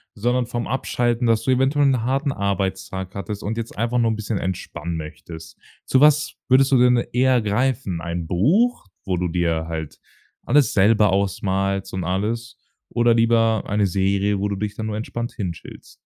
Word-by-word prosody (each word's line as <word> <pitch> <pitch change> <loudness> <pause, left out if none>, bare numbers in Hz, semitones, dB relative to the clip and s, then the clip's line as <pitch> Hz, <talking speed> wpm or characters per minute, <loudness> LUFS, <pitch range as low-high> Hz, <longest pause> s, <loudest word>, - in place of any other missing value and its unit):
sondern 120 +4 0
vom 120 0 -4
Abschalten, 120 -2 0
dass 115 -1 +2
du 130 - +1
eventuell 135 +3 +2
'n 130 -4 +2
harten 135 +3 0
Arbeitstag 95 -3 -3
hattest 100 +1 -6
und 110 +2 -3
jetzt 115 0 -6
einfach 120 +2 0
nur 115 -1 +2
'n - - -1
bisschen 110 0 -3
entspannen 85 -3 -4
möchtest. 80 +1 -9 0.3
Zu 130 - +2
was 150 +2 +4
würdest 135 +1 +4
du 135 - +5
denn 125 0 +5 0.2
eher 125 0 +3
greifen? 110 -3 -1
Ein 85 0 -4
Buch, 155 - +2 0.2
wo 95 -2 -1
du 90 +1 -1
dir 85 -2 -1
halt 80 -2 -6 0.5
alles 140 +1 +3
selber 105 +1 +4
ausmalst 95 0 -1
und 95 -2 -3
alles, 115 +6 -2 0.3
oder 120 0 +2
lieber 115 -2 +3
eine 105 0 +1
Serie, 100 +2 0
wo 100 - 0
du 100 - -3
dich 105 +1 -4
dann 110 - -5
nur 110 -1 -3
entspannt 115 +2 -4
hin 95 -7 -3
chillst? 85 - -13
110 Hz, 180 wpm, -22 LUFS, 95-120 Hz, 0.5 s, du